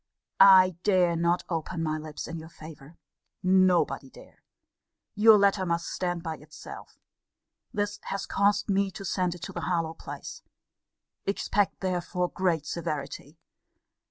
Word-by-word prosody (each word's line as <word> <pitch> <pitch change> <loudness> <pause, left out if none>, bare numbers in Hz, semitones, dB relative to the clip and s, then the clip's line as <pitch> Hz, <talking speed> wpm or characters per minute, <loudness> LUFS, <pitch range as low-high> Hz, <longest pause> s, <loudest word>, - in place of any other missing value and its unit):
I 185 -3 +7
dare 180 -4 +3
not 170 +1 +1
open 165 0 -3
my 155 -1 -1
lips 155 -1 -7
in 165 0 -6
your 160 0 -11
favour. 155 -1 -13 0.5
Nobody 185 -1 +3
dare. - - -17 0.7
Your 215 +1 +7
letter 200 -1 +3
must 170 -1 -1
stand 175 -2 -2
by 160 -2 -4
itself. 150 +1 -12 0.7
This 205 -1 -2
has 195 - -3
caused 205 +1 +1
me 200 -1 +1
to 195 +1 -9
send 180 -1 -1
it 175 - -12
to - - -6
Harlowe 165 -3 -1
place. - - -9 0.9
Expect 200 0 0
therefore 180 -1 -1
great 170 -5 0
severity. 150 -1 -5
180 Hz, 130 wpm, -27 LUFS, 165-195 Hz, 0.9 s, I